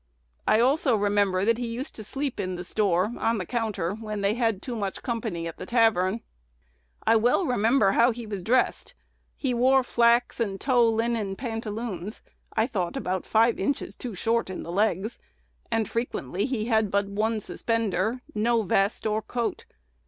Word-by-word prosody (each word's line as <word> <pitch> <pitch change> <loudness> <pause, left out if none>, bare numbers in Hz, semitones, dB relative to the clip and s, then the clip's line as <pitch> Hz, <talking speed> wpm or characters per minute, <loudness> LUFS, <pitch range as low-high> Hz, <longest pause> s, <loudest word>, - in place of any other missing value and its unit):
I 215 - +5
also 260 +1 +3
remember 200 -2 +2
that 230 +1 +2
he 245 - -2
used 240 +5 -5
to 215 - -8
sleep 270 +4 -3
in 185 -2 -2
the 175 - -5
store, 195 +2 +1
on 230 0 +1
the 185 - -3
counter, 215 -5 -2
when 215 -1 -5
they 200 +1 +2
had 225 -4 0
too 245 +3 -5
much 200 -3 -4
company 220 -9 -3
at 165 - -7
the - - -7
tavern. 225 -3 +2 0.8
"I 225 - +5
well 245 - +3
remember 230 -4 +3
how 235 +4 +5
he 235 -1 -4
was 205 -3 -5
dressed: 250 +7 +1 0.4
he 265 -3 -1
wore 260 +2 +4
flax 235 0 +3
and 200 -4 -1
tow 245 -4 +3
linen 225 -3 0
pantaloons, 225 -3 -5 0.3
I 220 - +2
thought 190 -9 -2
about 185 0 -2
five 230 +2 +3
inches 275 +8 -1
too 240 -5 -6
short 230 +2 0
in 185 - -5
the 170 - -6
legs, 205 +3 0 0.5
and 225 -2 0
frequently 205 - -2
he 240 -5 -2
had 220 -3 +2
but 200 +1 +1
one 215 +3 -1
suspender, 225 +1 -1
no 230 +2 +2
vest 195 +3 +1
or 215 0 +1
coat. 235 +1 -3
220 Hz, 175 wpm, -26 LUFS, 200-235 Hz, 0.8 s, I